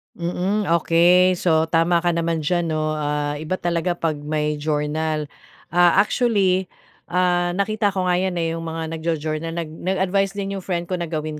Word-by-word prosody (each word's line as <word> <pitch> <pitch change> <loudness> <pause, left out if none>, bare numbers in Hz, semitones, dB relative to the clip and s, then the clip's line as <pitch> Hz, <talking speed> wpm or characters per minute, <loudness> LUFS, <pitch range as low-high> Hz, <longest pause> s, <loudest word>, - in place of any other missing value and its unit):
Mm, 185 +4 -1
okey. 175 +2 +4
So, 160 -2 +2
tama 170 +1 +3
ka 175 - +3
naman 165 -1 -1
dyan 175 +2 0
'no, 155 -1 -1
ah, 145 0 -2
iba 155 +4 -2
talaga 175 0 -1
pag 160 -3 -2
may 150 0 -2
journal. 155 +1 -1 0.5
Ah, 175 0 +5
actually, 195 -6 +1 0.4
ah, 175 -1 +1
nakita 205 +1 0
ko 185 - 0
nga 180 -1 +2
yan, 185 -1 -1
eh, 165 -1 -1
yung 165 0 -5
mga 160 0 -4
nagjo-journal 160 0 -3
nag 165 -2 -4
nag-advice 190 +3 -1
din 195 -1 -3
yung - - -12
friend 175 -1 -3
ko 180 - -1
na 170 - -3
gawin 155 -1 -4
170 Hz, 175 wpm, -22 LUFS, 155-180 Hz, 0.5 s, Ah